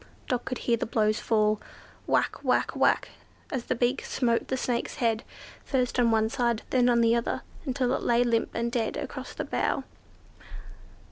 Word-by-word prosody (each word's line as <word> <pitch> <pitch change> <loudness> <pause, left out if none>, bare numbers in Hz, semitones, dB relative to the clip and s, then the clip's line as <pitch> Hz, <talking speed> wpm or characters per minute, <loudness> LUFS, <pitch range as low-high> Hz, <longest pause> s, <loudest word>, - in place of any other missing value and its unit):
Dot 245 -1 -1
could 255 - -3
hear 235 -1 +1
the - - -3
blows 215 -1 +1
fall,—whack, 215 -1 -1
whack, - - +2
whack,—as 260 -5 -1
the - - 0
beak 245 +2 +1
smote 235 -3 0
the 260 - -1
Snake's 245 -2 -2
head; 230 -2 +1 0.4
first 255 -2 0
on 240 -1 +4
one 220 -1 +3
side, 235 -1 0
then 250 -1 +4
on 235 -1 +4
the 230 0 +4
other, 235 - -1 0.2
until 255 -1 +1
it - - -1
lay 240 0 +3
limp 230 -2 +1
and 235 0 -1
dead 230 -2 -1
across - - -6
the - - -3
bough. - - 0 0.6
"Ah! - - -20
235 Hz, 175 wpm, -27 LUFS, 230-250 Hz, 0.6 s, on